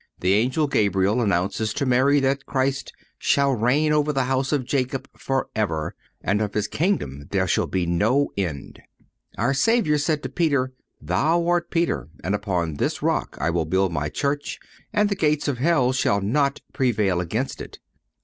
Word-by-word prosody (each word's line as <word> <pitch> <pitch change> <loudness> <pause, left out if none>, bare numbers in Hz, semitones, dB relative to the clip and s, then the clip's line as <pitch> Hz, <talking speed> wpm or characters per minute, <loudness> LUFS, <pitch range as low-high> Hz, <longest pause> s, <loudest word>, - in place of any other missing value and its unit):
The 90 +1 +2
Angel 125 +9 +2
Gabriel 100 -3 +2
announces 100 +2 0
to 140 - 0
Mary 130 +3 +4
that 135 +1 0
Christ 135 0 -1 0.3
"shall 140 -1 +2
reign 135 +7 +2
over 150 0 +2
the 135 -2 +1
house 130 +1 0
of 140 -4 0
Jacob 130 0 -1
forever, 105 - -2 0.3
and 105 +2 +1
of 105 -2 -2
his 105 -1 0
kingdom 70 - -1
there - - +1
shall - - +1
be 90 -2 -1
no 110 +12 +2
end."(101) 85 -8 -4 0.6
Our 120 +5 +1
Savior 155 - +2
said 150 0 0
to 130 - -3
Peter: 140 -3 0 0.3
"Thou 170 +3 +1
art 175 -1 +1
Peter, 170 - -1
and 95 - -1
upon 90 -7 -1
this - - -1
rock - - -1
I 80 +5 +1
will 85 -1 0
build 95 +2 +1
My 75 -1 -1
Church, 145 - -2 0.3
and 210 0 +2
the 205 - 0
gates 150 -5 +1
of 135 -4 -1
hell 135 -4 +3
shall 100 -6 +2
not 140 +8 0
prevail 105 -8 +1
against 110 +10 -3
it." - - -9
130 Hz, 170 wpm, -23 LUFS, 100-145 Hz, 0.6 s, Mary